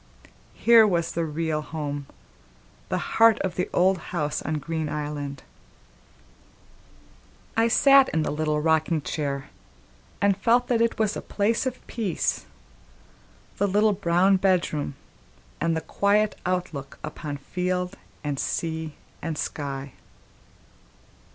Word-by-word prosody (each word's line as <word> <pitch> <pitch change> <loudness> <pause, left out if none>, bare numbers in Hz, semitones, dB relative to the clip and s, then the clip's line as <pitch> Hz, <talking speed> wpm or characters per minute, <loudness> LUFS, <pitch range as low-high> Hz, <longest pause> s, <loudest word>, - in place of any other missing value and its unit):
Here 230 -2 +6
was 170 -3 0
the 170 0 -1
real 155 0 -1
home, 145 -2 -5 0.8
the - - 0
heart 225 -1 +4
of 190 -2 -1
the 180 +1 -2
old 185 +1 +3
house 150 -4 -1
on 155 - -2
Green 160 +1 -3
Island! 145 -2 -4 2.1
I 225 +1 +4
sat 275 +3 +6
in 160 - 0
the - - -1
rocking 155 +1 +1
chair, 140 -3 -3 0.7
and 200 -1 +3
felt 235 +5 +2
that 235 -2 +2
it 230 0 +1
was 215 -1 +1
a - - -4
place 225 +5 0
of 255 0 -5
peace, 210 -8 -2 1.1
the 200 - +2
little 210 +2 +3
brown 190 0 +3
bedroom, 175 -7 0 0.6
and 165 0 +1
the - - -2
quiet 205 +5 +1
outlook 175 -7 -3
upon 150 -1 -5
field 180 +5 -2 0.3
and 145 -2 -2
sea 160 -2 -3 0.3
and 160 -2 -3
sky. 140 -2 -4
170 Hz, 120 wpm, -25 LUFS, 150-200 Hz, 2.1 s, Here